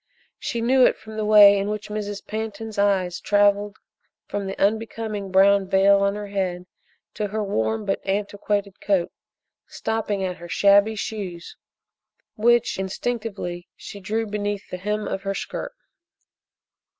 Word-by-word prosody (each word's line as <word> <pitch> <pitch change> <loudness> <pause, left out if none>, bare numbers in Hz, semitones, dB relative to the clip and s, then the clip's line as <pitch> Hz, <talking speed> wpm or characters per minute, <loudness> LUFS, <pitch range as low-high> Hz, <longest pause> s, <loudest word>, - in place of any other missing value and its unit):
She 235 - -3
knew 255 +2 +4
it - - +4
from 220 0 -11
the 215 -1 -2
way 205 -1 +8
in 200 +1 -2
which 210 0 -4
Mrs. 205 -1 -5
Pantin's 220 0 -5
eyes 190 -3 +1
travelled 205 0 +2 0.5
from 200 -1 -4
the 195 - -5
unbecoming 215 -1 -1
brown 195 +1 +4
veil 195 +1 +5
on 200 0 +1
her 210 0 -5
head 185 -3 -2 0.5
to 210 - -2
her 215 +1 -2
warm 110 - -1
but 195 - -1
antiquated 200 0 -2
coat, 190 -4 +1 0.6
stopping 215 -3 -2
at 185 -1 -3
her 175 0 -10
shabby 200 +4 +4
shoes 195 -5 -6 0.8
which, 235 -1 +2
instinctively, 190 -3 -4
she 200 - -10
drew 220 +4 -2
beneath 205 -1 -4
the 180 - -3
hem 210 +3 -2
of 190 - -3
her 195 0 -3
skirt. - - -5
205 Hz, 145 wpm, -23 LUFS, 195-215 Hz, 0.8 s, way